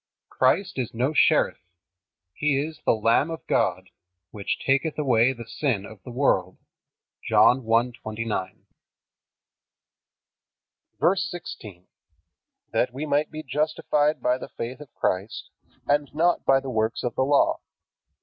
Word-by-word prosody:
Christ 165 +5 +1
is 120 -2 -3
no 130 +6 0
sheriff. - - +3 0.7
He 145 +4 +1
is 155 +2 -5
"the - - +5
Lamb 115 +7 +2
of 165 0 -7
God, 95 +1 0 0.4
which 100 -2 -3
taketh 140 +3 +1
away 130 -4 +3
the 120 -3 -8
sin 115 -5 -2
of 105 -1 -12
the - - -11
world." 120 -8 +1 0.7
(John 130 +2 +4
1:29.) 115 -3 -2 2.4
VERSE 190 +2 +2
16. 105 - -9 0.9
That 125 - +1
we 135 +5 -5
might 145 0 +1
be 155 0 -7
justified 150 +1 0
by 125 +1 +2
the - - -8
faith 120 +4 -6
of 145 -5 -12
Christ, 95 +4 -2 0.3
and 145 0 +1
not 170 +2 +2
by 135 0 +5
the 135 -1 -6
works 110 0 -1
of 125 - -2
the - - -1
Law. 140 +2 +3
130 Hz, 130 wpm, -25 LUFS, 115-150 Hz, 2.4 s, the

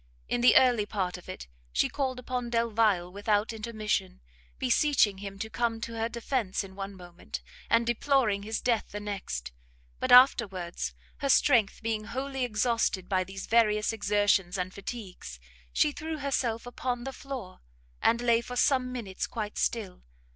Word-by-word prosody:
in 245 - 0
the 245 - +6
early 245 -5 +5
part 190 -4 -2
of 180 - -11
it, 60 - -7 0.3
she - - +2
called 265 -3 -2
upon 250 -1 -3
Delvile 225 -6 +2
without 205 +2 0
intermission, 215 - -2 0.4
beseeching 205 - +3
him 195 0 -7
to 220 +2 -4
come 230 0 -1
to 230 - -5
her 225 0 -1
defence 235 -4 -2
in 190 -1 -11
one 195 0 -6
moment, 175 - -8 0.3
and 230 0 +4
deploring 240 -3 +2
his 220 +2 -3
death 235 -3 +1
the 205 - -5
next; 190 - -5 0.5
but - - -1
afterwards, 190 - +4 0.2
her 275 - -2
strength 235 -7 +4
being 220 -1 -1
wholly 265 +3 -3
exhausted 225 -5 0
by 185 -2 +1
these 190 +1 -7
various 215 -1 +3
exertions 205 -3 +2
and 185 0 -3
fatigues, 195 - -7 0.3
she 300 - +3
threw 315 +2 -5
herself 255 -5 -1
upon 245 0 -3
the 270 +1 -5
floor, 260 -11 -7 0.4
and 235 +1 +3
lay 235 -1 +3
for 250 +1 -7
some 255 -1 +2
minutes 220 -7 -4
quite 210 -3 -5
still. 205 -6 -1
220 Hz, 160 wpm, -29 LUFS, 195-245 Hz, 0.5 s, the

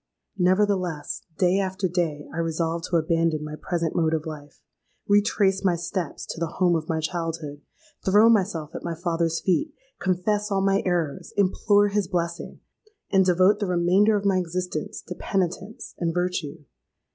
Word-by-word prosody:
Nevertheless, 185 -4 +1 0.2
day 185 +1 +3
after 190 0 -1
day 165 -5 -2
I 165 - -4
resolved 165 0 -1
to 175 - -2
abandon 165 -1 +1
my 150 0 -6
present 170 0 -2
mode 160 -1 +2
of 155 0 -3
life—retrace 195 +6 -1
my 185 -3 +3
steps 170 -1 -4
to - - -6
the 170 -1 -3
home 180 -2 +3
of 160 -1 -3
my 160 -1 0
childhood—throw 165 +5 -1
myself 180 -8 +1
at - - -6
my 170 -1 -3
father's 165 -1 -1
feet—confess 210 - -1
all 195 -1 +1
my 195 +1 +2
errors—implore 185 +5 +1
his 205 -2 0
blessing—and 190 - -3
devote 185 +3 +4
the 205 - -1
remainder 180 +5 +3
of 200 -1 -1
my 195 -2 +3
existence 180 +1 -4
to - - -6
penitence 195 +4 -3
and 165 -1 -1
virtue. 175 -4 -2
180 Hz, 145 wpm, -25 LUFS, 165-195 Hz, 0.2 s, devote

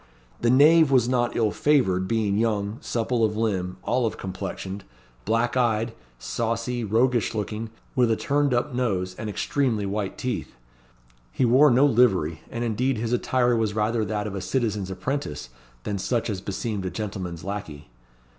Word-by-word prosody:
The 120 - +2
knave 150 +4 +6
was 130 -3 +4
not 120 -1 +1
ill 110 -2 +2
favoured; 95 -11 +2
being 110 -2 +1
young, 105 -1 0
supple 115 0 -1
of 105 -1 +1
limb, 95 -5 -1
olive 120 -3 0
complexioned, 95 +1 -5 0.4
black 115 +3 +1
eyed, 115 -2 +1 0.2
saucy, 115 - -2
roguish 115 +1 +1
looking, 105 +1 -3 0.3
with 125 -2 +3
a 115 - +3
turned 145 +3 +1
up 125 +3 0
nose, 95 -7 -1
and 110 -1 -4
extremely 115 -1 0
white 100 0 -3
teeth. 130 -4 -4 0.8
He 130 - +1
wore 130 +5 +6
no 130 +3 +5
livery, 95 - +3
and 120 +1 -4
indeed 120 +3 0
his 115 +2 -2
attire 125 0 +2
was 110 -2 0
rather 110 +1 +1
that 105 0 -2
of 105 - -4
a 95 - -4
citizen's 105 -7 -1
apprentice 95 - -4 0.3
than 100 -1 -3
such 115 +2 -1
as 95 -2 -4
beseemed 100 +1 -3
a - - -1
gentleman's 90 -5 -5
lacquey. 80 -9 -6
115 Hz, 160 wpm, -25 LUFS, 100-125 Hz, 0.8 s, knave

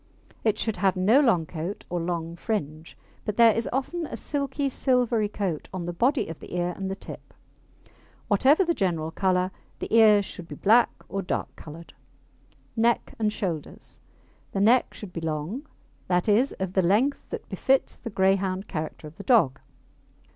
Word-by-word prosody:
It 215 -2 +2
should 220 -3 -2
have 190 +1 +2
no 200 +8 +4
long 225 - +3
coat 170 +5 -6
or 175 - -2
long 170 -1 -3
fringe, 155 - -4 0.3
but 210 - -4
there 230 -2 +7
is 230 - -1
often 310 +6 -2
a - - -6
silky, 280 -1 -2
silvery 245 -5 +1
coat 195 -7 -3
on 185 -2 -4
the 175 - -3
body 255 - +1
of 165 - -7
the - - -8
ear 175 0 0
and 195 -1 -4
the 195 - -3
tip. - - -11 0.9
Whatever 270 - +4
the 340 - +2
general 165 - -1
colour, 185 0 +1 0.3
the - - -2
ears 210 -3 +6
should 175 -3 -9
be - - -8
black 230 +4 +4 0.2
or 195 - -3
dark 180 - -3
coloured. 165 +2 -11 0.8
NECK 235 +1 +1
AND 215 -1 +1
SHOULDERS 170 -8 -5 0.5
The 195 - 0
neck 235 +5 +4
should 195 -4 -9
be 165 - -4
long 165 - -3 0.4
that 180 +1 +1
is, 225 +6 +3
of 190 -1 -4
the 190 - +3
length 215 +11 +1
that - - -6
befits 270 0 +1
the 230 - -7
Greyhound 190 -1 +1
character 155 -2 -5
of 150 +1 -11
the 200 - -8
dog. 200 - +3
195 Hz, 175 wpm, -26 LUFS, 175-230 Hz, 0.9 s, there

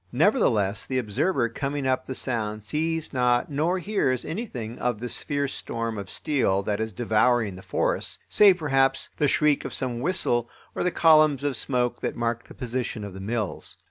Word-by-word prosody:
Nevertheless, 120 - +2
the 130 - -1
observer 130 - +1
coming 140 +4 -3
up 130 -1 0
the 130 - -4
Sound 110 -5 -3
sees 160 +6 -2
not 125 +1 +2
nor 160 +6 +1
hears 180 - 0
anything 130 - -5
of 120 -3 -1
this 120 +1 -3
fierce 140 -1 -2
storm 115 -2 -3
of 100 -2 -7
steel 110 -10 +1
that 105 +1 -1
is 110 0 -2
devouring 110 0 +2
the 95 - -10
forests, - - -1
save 200 -3 +6
perhaps 135 -4 +1
the 150 - +2
shriek 150 0 +2
of - - -4
some 125 -3 -2
whistle 120 -6 0 0.2
or - - -3
the 180 - +2
columns 155 -5 +4
of 145 -2 0
smoke 125 0 +1
that - - -2
mark 115 0 -2
the - - -13
position 125 -3 -3
of 100 -2 -7
the 95 - -8
mills. 105 0 -3
125 Hz, 180 wpm, -25 LUFS, 115-150 Hz, 0.2 s, save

